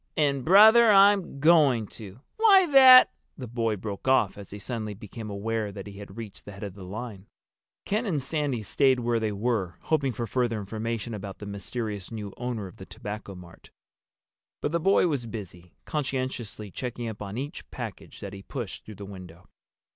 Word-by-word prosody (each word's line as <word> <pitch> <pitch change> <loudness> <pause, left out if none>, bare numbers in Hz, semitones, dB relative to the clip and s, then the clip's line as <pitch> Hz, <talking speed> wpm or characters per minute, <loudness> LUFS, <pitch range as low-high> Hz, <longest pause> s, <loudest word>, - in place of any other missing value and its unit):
"And, 140 -3 +1
brother, 220 - +7
I'm 195 -6 +5
going 145 -7 +4
to! 105 +2 -11 0.2
Why 405 -4 +6
that—!" 260 -2 +9 0.3
The 130 - -6
boy 115 -2 -1
broke 100 +3 -7
off 130 -7 +3
as 100 -2 -11
he 100 - -8
suddenly 110 -1 -5
became 110 +1 -9
aware 105 +1 -2
that 100 -1 -8
he 100 -1 -10
had 100 0 -11
reached 110 -4 -9
the 105 - -9
head 100 +2 -10
of 100 -3 -5
the 100 -1 -11
line. 105 +1 -7 0.6
Ken 215 +3 -1
and 160 -7 0
Sandy 140 -5 -1
stayed 130 +4 +2
where 120 -1 +1
they 110 -1 -1
were, 100 -5 -2
hoping 140 -4 0
for 120 +1 -4
further 115 -1 -1
information 110 +2 -4
about 100 -2 -7
the 105 - -9
mysterious 100 0 -5
new 105 -3 -6
owner 120 -4 -4
of 90 - -12
the - - -10
Tobacco 105 -1 -7
Mart. 90 -2 -14 0.9
But 145 - -2
the 170 - +1
boy 195 +3 +3
was 140 -8 -1
busy, 90 -6 -9
conscientiously 130 -7 -4
checking 120 0 -5
up 110 -2 -7
on 100 +1 -6
each 140 +3 -6
package - - -8
that 100 -1 -7
he 100 - -9
pushed 115 -3 -6
through 110 - -11
the 100 - -9
window. 90 -2 -12
115 Hz, 185 wpm, -27 LUFS, 100-135 Hz, 0.9 s, that